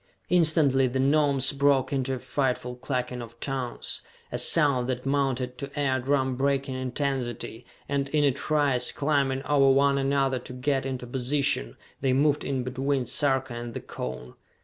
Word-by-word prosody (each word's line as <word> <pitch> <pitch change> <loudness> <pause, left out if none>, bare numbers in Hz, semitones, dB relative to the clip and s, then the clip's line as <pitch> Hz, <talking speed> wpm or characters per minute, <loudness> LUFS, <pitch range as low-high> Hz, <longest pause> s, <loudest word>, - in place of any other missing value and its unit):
Instantly 155 -6 +4
the 130 +2 -2
Gnomes 140 -1 +3
broke 140 -1 +2
into 135 -1 0
a - - -5
frightful 125 -1 -2
clucking 125 -1 -3
of 115 0 -11
tongues, 130 -3 -3 0.3
a - - -2
sound 140 -6 +2
that 125 0 -3
mounted 135 -2 -1
to 140 - -5
ear 135 -2 +1
drum 130 0 0
breaking 135 0 0
intensity, 130 -3 -3 0.2
and 140 -1 -1
in 150 0 +2
a 140 - +4
trice, 140 -2 +1
climbing 140 -2 0
over 140 -2 +4
one 140 +1 +4
another 135 -1 +1
to 125 - -10
get 135 +1 -1
into 130 -2 -4
position, 135 +2 0 0.2
they 130 -1 +1
moved 145 +2 +2
in 135 -2 -2
between 130 +1 -1
Sarka 130 0 0
and 120 0 -6
the - - -2
cone. 65 0 -7
135 Hz, 160 wpm, -27 LUFS, 125-140 Hz, 0.3 s, Instantly